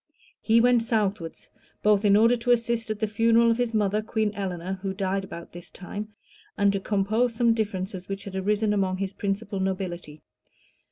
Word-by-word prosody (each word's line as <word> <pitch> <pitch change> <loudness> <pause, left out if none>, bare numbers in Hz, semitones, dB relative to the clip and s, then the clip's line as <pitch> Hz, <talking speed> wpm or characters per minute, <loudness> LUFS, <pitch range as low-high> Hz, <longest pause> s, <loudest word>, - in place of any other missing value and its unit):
He 225 +1 +4
went 245 0 +4
southwards, 205 -7 -2 0.4
both 210 -1 +4
in 205 -1 +5
order 230 +3 +5
to 240 +1 -5
assist 235 -1 +1
at 215 -1 -3
the 220 - +1
funeral 230 +2 +3
of 230 - +1
his 245 -2 0
mother, 210 -1 +1
Queen 215 -1 -1
Eleanor, 190 -2 -4
who 190 -1 -3
died 195 0 -1
about 170 -3 -9
this 175 0 -10
time, 205 +3 -7 0.5
and 200 0 +3
to 200 - 0
compose 215 +4 0
some 235 0 +3
differences 190 -4 -3
which 195 0 -4
had 195 -1 -8
arisen 210 +2 +1
among 190 -2 0
his 195 0 -3
principal 200 0 -3
nobility. 180 -5 -4
205 Hz, 180 wpm, -26 LUFS, 190-225 Hz, 0.5 s, in